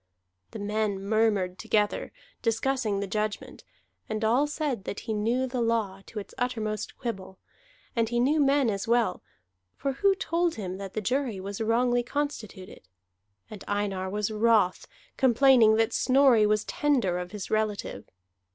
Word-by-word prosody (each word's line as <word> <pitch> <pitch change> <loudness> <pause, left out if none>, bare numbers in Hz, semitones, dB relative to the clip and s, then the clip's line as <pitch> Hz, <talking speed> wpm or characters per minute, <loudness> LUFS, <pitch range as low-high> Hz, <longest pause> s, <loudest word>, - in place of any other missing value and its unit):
Then 205 - -6
men 210 -1 -1
murmured 200 -3 +1
together, 215 -2 0 0.3
discussing 230 -3 0
the - - -1
judgment; 210 +1 -4 0.5
and 215 0 -1
all 250 +7 +3
said 290 -8 -3
that 200 - -5
he 225 - -3
knew 230 +5 0
the 255 -1 -3
law 220 -4 0
to 230 - -11
its 205 - -6
uttermost 220 -4 -3
quibble, 190 -6 -6 0.6
and 230 -1 +1
he 240 0 0
knew 285 +6 +3
men 275 -4 +3
as 200 +1 -4
well, 230 -5 +1 0.5
for 275 - -2
who 390 +9 +2
told 345 -2 0
him 190 -3 -5
that 195 -1 -7
the 215 - -2
jury 250 -1 -1
was 200 +2 -6
wrongly 240 +2 +2
constituted? 235 - -5 0.6
And 210 -2 -10
Einar 200 -2 -2
was 210 +2 -2
wroth, 215 -4 +2 0.3
complaining 255 -3 +5
that 225 0 +1
Snorri 255 -5 +4
was 210 0 +1
tender 245 -12 +1
of 180 0 -5
his 205 -1 -7
relative. 215 - -2
220 Hz, 150 wpm, -27 LUFS, 205-250 Hz, 0.6 s, complaining